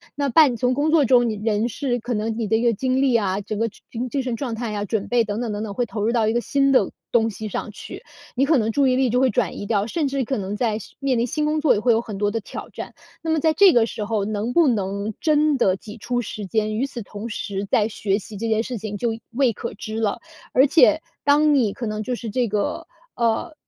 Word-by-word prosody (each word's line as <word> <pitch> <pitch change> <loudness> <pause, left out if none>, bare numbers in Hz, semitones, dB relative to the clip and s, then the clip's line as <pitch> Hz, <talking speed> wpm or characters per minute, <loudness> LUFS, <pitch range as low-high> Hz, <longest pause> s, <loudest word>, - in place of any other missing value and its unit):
那 285 -1 0
半 270 -2 +5
从 250 +1 +1
工 295 +4 +1
作 310 -3 +5
中 240 -1 +4
人 215 +1 -1
是 245 +2 -2
可 245 +2 -4
能 220 +1 -2
你 225 - -1
的 220 +2 +2
一 - - -1
个 235 -1 +3
精 260 +4 0
力 260 -3 +3
啊， 195 -3 +1
整 205 +1 -5
个 230 - +1 0.2
精 245 +2 -4
精 275 +1 -1
神 250 -2 -2
状 245 -2 -4
态 225 -1 -4
呀 205 -1 -2
准 205 0 -2
备 240 -1 +3
等 210 +1 -3
等 230 -3 -2
等 205 - -3
等， 205 -2 -5
会 245 +3 0
投 210 -2 -4
入 230 - +2
到 230 -3 +2
一 220 - +1
个 240 - +1
新 275 +2 +2
的 - - +4 0.2
东 225 -1 +3
西 215 +1 -6
上 210 - -4
去， - - -10 0.3
你 270 +3 +3
可 310 -1 +4
能 225 -1 +1
注 280 +3 +2
意 255 - +3
力 260 -2 +2
就 245 - +2
会 260 0 +4
转 - - -1
移 205 - -5
掉， 205 -1 +1
甚 310 +1 -1
至 270 -1 -1
可 265 +2 -2
能 195 +1 -3
在 220 -1 0 0.2
面 270 -3 0
临 235 - +1
新 300 +3 -1
工 305 0 +1
作 305 - +5
也 205 - 0
会 240 +3 +3
有 225 - +3
很 210 -4 -7
多 205 0 +1
的 225 - -1
挑 - - -8
战。 - - -8 0.3
那 325 - -4
么 320 - +2
在 315 +1 +2
这 375 +2 +6
个 230 -2 +4
时 215 -2 -5
候 210 -2 -1
能 215 +3 -2
不 335 -1 +5
能 200 -2 -1
真 305 -2 +2
的 190 -6 +3
挤 210 +3 -11
出 245 +3 -2
时 210 -2 -6
间， 215 +1 -1
与 260 - +1
此 245 -4 -7
同 205 +2 -7
时 200 -1 -4
在 215 -1 +3
学 205 -2 -1
习 205 0 -10
这 230 - -3
件 220 -1 +2
事 245 0 -5
情 210 0 -5
就 235 +3 0 0.2
未 250 -1 +2
可 215 - -6
知 215 +2 -6
了。 210 -3 0 0.3
而 265 +3 +5
且 315 +1 +5 0.2
当 295 +1 +4
你 230 -7 +2
可 240 - -5
能 215 0 -3
就 250 - -3
是 230 -2 -6
这 245 +2 0
个， 210 -1 -2 0.3
呃， 235 +6 0
230 Hz, 290 characters per minute, -22 LUFS, 215-260 Hz, 0.3 s, 这